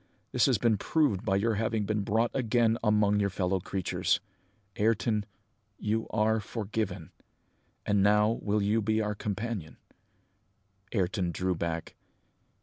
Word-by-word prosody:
That - - +2
has - - +3
been 115 -3 +2
proved 115 - +1
by 95 -4 +1
your 110 +4 +2
having 110 -2 0
been 105 0 0
brought 110 +4 +1
again 115 -3 +2
among 105 -1 +3
your 100 -1 +1
fellow 95 0 0
creatures. 95 +1 -1 0.6
Ayrton, 110 -1 +1 0.5
you 110 +1 -1
are 110 +1 +2
forgiven! 100 -5 -4 0.7
And 105 -1 +2
now 105 +2 +3
you 105 +1 +1
will - - -1
be 110 +1 +1
our 105 -1 0
companion?" 105 -4 -4 1.1
Ayrton 95 -3 0
drew 95 +2 -1
back. 85 -1 -3
105 Hz, 135 wpm, -29 LUFS, 95-110 Hz, 1.1 s, has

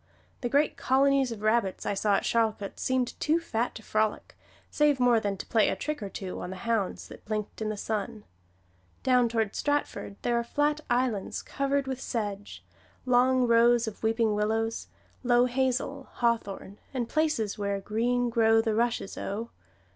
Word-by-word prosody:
The 245 - -2
great 285 +4 +2
colonies 270 0 +3
of 215 -2 -7
rabbits 215 -3 +1
that - - -1
I - - 0
saw 200 +1 +2
at - - 0
Charlcote 220 -3 0
seemed 255 -1 0
too 315 +3 +2
fat 240 -7 -2
to 220 - -9
frolic, 215 0 -1 0.4
save 295 -2 +3
more 245 -2 +4
than 205 -2 -2
to - - -7
play 225 -3 +3
a - - -1
trick 300 -3 -4
or 200 - -4
two 190 -1 -6
on - - -5
the 190 - -6
hounds 220 -1 -2
that - - -12
blinked 215 0 -4
in 215 - -1
the 215 - -3
sun. 215 +1 -3 0.8
Down 250 -2 +4
toward 225 -3 0
Stratford 290 -8 -2
there 240 -1 +2
are - - -1
flat 295 +5 0
islands 240 -5 0
covered 275 0 -1
with 265 -1 -4
sedge, 205 -3 -4 0.4
long 255 0 +4
rows 235 0 +4
of 215 - -7
weeping 225 -1 +2
willows, 220 +2 -1 0.3
low 245 -1 +4
hazel, 260 +2 -1
hawthorn, 215 -4 -2 0.2
and 240 -3 -1
places 300 -11 0
where 200 -1 -1
"Green 240 +4 0
Grow 225 -1 +4
the 225 -1 +1
Rushes, 230 -2 -1
O." 220 +4 -4
230 Hz, 175 wpm, -28 LUFS, 215-255 Hz, 0.8 s, more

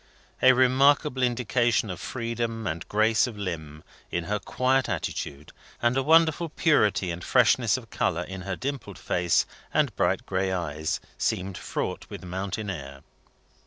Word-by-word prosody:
A 130 0 +7
remarkable 130 +2 +3
indication 120 -2 +1
of 90 - -7
freedom 115 -1 -3
and 85 -2 -3
grace 110 +2 +3
of 115 -4 -8
limb, 80 -6 -5 0.3
in 85 - -2
her 105 +4 -2
quiet 130 +4 +1
attitude, 70 +2 -4 0.3
and 120 +1 +2
a 135 - +2
wonderful 165 +2 +4
purity 105 - +2
and 85 +1 -6
freshness - - +3
of - - -11
colour 85 +2 0
in 95 +1 -7
her 95 0 -3
dimpled 130 -6 -5
face 85 -2 +1 0.3
and - - +1
bright - - +1
gray 95 0 -1
eyes, 80 -4 -2 0.2
seemed 95 +1 -1
fraught - - -4
with - - -8
mountain 95 +3 -4
air. 70 -5 -8
105 Hz, 150 wpm, -26 LUFS, 90-130 Hz, 0.3 s, A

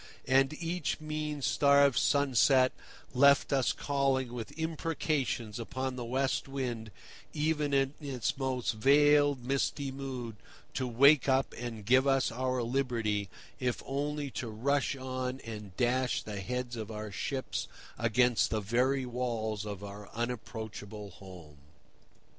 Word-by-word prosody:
And 135 +2 +4
each 165 -3 -2
mean 155 -2 -4
starved 140 -1 +4
sunset 135 -2 +4 0.4
left 140 +2 +5
us 135 -2 +3
calling 135 -3 0
with 115 -3 -5
imprecations 155 -8 -2
upon 130 +2 -3
the 125 - -4
West 130 +4 -1
Wind 125 -5 -4 0.4
even 150 -1 0
in 135 0 +2
its 135 -5 -2
most 130 -3 -1
veiled 145 +2 +4
misty 140 +1 -1
mood 130 -5 -6 0.4
to 130 - -1
wake 140 +4 +5
up 130 -2 +2
and 115 -3 -6
give 130 +4 +4
us 135 -4 +2
our 130 +1 -1
liberty, 115 -5 -1 0.3
if 125 -2 -1
only 145 +1 -2
to 125 - -4
rush 140 +6 0
on 130 0 -4
and 105 -4 -8
dash 125 0 +1
the 105 -2 -5
heads 125 +3 -3
of 110 -2 -5
our 105 -1 -6
ships 130 +6 -3 0.3
against 120 +1 +3
the 110 - 0
very 125 +6 +1
walls 115 -4 -2
of 100 -1 -6
our 100 0 -9
unapproachable 110 -3 -5
home. 90 -6 -13
130 Hz, 130 wpm, -31 LUFS, 115-140 Hz, 0.4 s, left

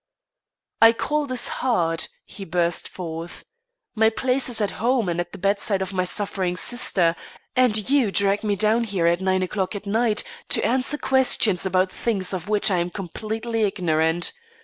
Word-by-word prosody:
"I 225 0 +8
call 300 +5 -2
this 255 -2 +1
hard," 170 -10 0 0.2
he 200 - -9
burst 170 -1 -1
forth. 165 -1 -8 0.5
"My 220 0 +3
place 255 +3 0
is 235 - +2
at 205 -2 0
home 240 -2 +1
and 170 0 -2
at 175 0 -3
the - - -9
bedside 200 0 0
of 190 +1 -7
my 185 -1 0
suffering 185 -2 -2
sister, 180 -7 +1 0.4
and 225 -5 +3
you 265 -6 +2
drag 200 +1 +1
me 205 -1 0
down 220 +4 +2
here 195 -6 -1
at 170 +2 +2
nine 190 0 +1
o'clock 190 +2 -3
at 205 - -7
night 220 +1 +1 0.3
to - - +3
answer 260 +4 +1
questions 250 -9 +3
about 185 0 +1
things 200 -5 -2
of 185 +1 -5
which 215 0 +2
I 185 - +2
am 170 +1 -1
completely 220 +5 -4
ignorant. 170 -4 +1
200 Hz, 170 wpm, -23 LUFS, 180-230 Hz, 0.5 s, I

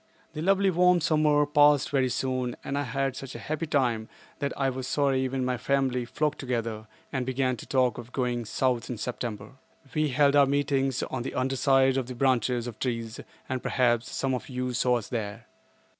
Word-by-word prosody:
The 155 - -5
lovely 195 +2 +3
warm 180 0 +4
summer 150 -2 +3
passed 145 -1 +4
very 135 -3 +2
soon 130 -1 -1
and 140 - -3
I 145 - 0
had 135 0 -2
such 135 -1 -8
a - - -4
happy 155 +2 -3
time 120 -7 0 0.3
that 140 -1 -1
I 135 - +1
was 130 0 -5
sorry 135 -2 +1
when 130 -1 -2
our 125 -1 -1
family 130 -1 0
flocked 150 +4 -1
together 115 -4 -3 0.3
and 130 -2 0
began 130 0 0
to - - -10
talk 130 -2 +1
of 120 +1 -10
going 125 -3 -1
South 120 +1 0
in 125 - -4
September. 110 -1 -5 0.4
We 155 -1 +1
held 140 +1 +3
our 140 -1 +6
meetings 135 -2 0
on 130 - -4
the 125 - -5
underside 135 0 +3
of 130 -3 -1
the 125 - -6
branches 125 -2 +1
of 120 -3 -7
trees 115 -3 -3 0.3
and, 130 -1 -3
perhaps, 120 -2 +1
some 135 -1 -1
of 125 - -4
you 125 -1 -3
saw 125 0 +2
us 115 - -6
there. 110 -1 -4
130 Hz, 195 wpm, -27 LUFS, 125-140 Hz, 0.4 s, our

